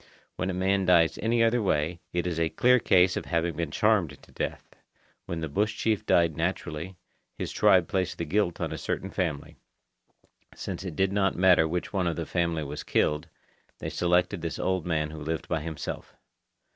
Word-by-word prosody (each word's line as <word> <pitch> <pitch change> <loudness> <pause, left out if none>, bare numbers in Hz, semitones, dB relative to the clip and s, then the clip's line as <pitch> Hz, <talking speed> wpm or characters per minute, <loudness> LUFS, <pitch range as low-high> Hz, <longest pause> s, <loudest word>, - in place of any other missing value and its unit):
When 95 - -2
a - - -1
man 95 +1 +1
dies 85 -2 +5
in - - -5
any 115 +1 +3
other 115 +1 +3
way, 85 -3 0
it 85 0 -1
is 85 -2 -2
a 80 -1 +1
clear 125 +6 +4
case 90 -3 +4
of - - -3
having 85 -1 -1
been 85 -1 -2
charmed 90 -5 +1
to - - -18
death. - - -5 0.5
When 85 -1 -4
the 80 - -2
bush 105 +9 -1
chief 110 -3 0
died 85 -3 +3
naturally, 85 +1 -3 0.4
his - - -4
tribe 90 -3 +4
placed 95 -2 -1
the 85 - -3
guilt 90 +1 0
on - - -2
a - - -5
certain 95 - -3
family. 80 -7 -3 1.0
Since 90 -1 -5
it 90 -5 -6
did 95 +2 +1
not 95 -2 +2
matter 90 -3 +5
which 90 +4 -3
one 95 -3 +1
of 85 - -1
the - - -3
family 85 -2 -1
was 75 0 -5
killed, 75 0 0 0.5
they - - -5
selected 90 +1 +1
this 85 -1 -4
old 95 -2 -1
man 75 -3 0
who 80 -1 -8
lived 80 +1 -3
by 85 - 0
himself. 80 -2 -6
85 Hz, 195 wpm, -27 LUFS, 80-95 Hz, 1.0 s, dies